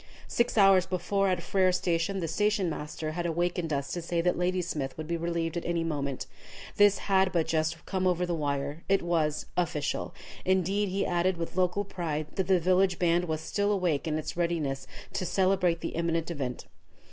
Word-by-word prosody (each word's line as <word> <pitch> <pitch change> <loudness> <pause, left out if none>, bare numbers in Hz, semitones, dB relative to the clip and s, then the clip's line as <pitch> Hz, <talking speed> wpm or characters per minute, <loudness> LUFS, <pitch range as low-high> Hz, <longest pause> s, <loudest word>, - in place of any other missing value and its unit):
Six 235 -1 0
hours 195 -2 +6
before, 190 +2 0
at 180 -2 0
Frere 190 -1 +3
Station, 180 +1 0
the 165 - -1
station 205 +2 +1
master 155 +1 -4
had 170 +2 -2
awakened 175 0 -1
us 140 -1 -2
to 175 - -3
say 170 +1 -1
that 180 +1 +2
Ladysmith 175 -6 -1
would 155 -1 -5
be 170 - -1
relieved 170 0 -2
at 170 - -4
any 170 -1 0
moment. 140 -4 -2 0.5
This 205 -1 +6
had 190 -1 +3
but 170 -3 +1
just 160 0 -1
come 185 -1 0
over 180 0 +1
the 175 - -2
wire. 145 -1 -2
It 195 -2 +3
was 160 -3 0
"official." 155 -5 -1 0.3
Indeed, 190 +2 +1
he 195 +2 0
added, 175 +1 +1
with 165 +1 -5
local 185 +2 +1
pride, 160 -5 -3
that 190 -2 0
the 190 -2 +4
village 185 +1 +3
band 175 0 +2
was 160 -2 -2
still 205 +4 0
awake 175 -6 0
and 155 -1 0
in 155 - -4
readiness 165 -6 -1 0.3
to - - -1
celebrate 185 -1 +2
the - - -2
imminent 165 0 -1
event. 135 -6 -4
175 Hz, 190 wpm, -29 LUFS, 160-185 Hz, 0.5 s, hours